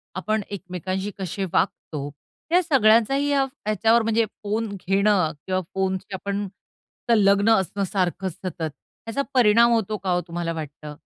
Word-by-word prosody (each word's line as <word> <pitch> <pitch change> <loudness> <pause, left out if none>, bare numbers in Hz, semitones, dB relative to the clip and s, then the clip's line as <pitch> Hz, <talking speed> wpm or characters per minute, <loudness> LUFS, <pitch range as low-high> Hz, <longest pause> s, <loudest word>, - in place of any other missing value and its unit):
आपण 215 +4 -1
एकमेकांशी 190 +1 -4
कसे 195 +1 -3
वागतो, 145 -2 -1 0.4
या 360 +2 +5
सगळ्यांचाही 270 -1 +4
या 280 -1 +3
ह्याच्यावर, 230 -3 +1
म्हणजे 225 0 +2 0.2
फोन 215 +2 -1
घेणं 195 -3 +2
किंवा 185 0 0
फोनची 190 0 -2
आपण 200 +1 -3 0.6
सलग्न 200 -1 +4
असणं, 200 -1 0
सारखं 190 0 -1
सतत, 180 -1 -7 0.5
ह्याचा 250 +5 -1
परिणाम 235 -1 +5
होतो 215 -2 +1
का? 190 0 -5
हो, 175 - +1
तुम्हाला 170 0 -3
वाटतं? 150 -1 -7
200 Hz, 135 wpm, -24 LUFS, 185-225 Hz, 0.6 s, या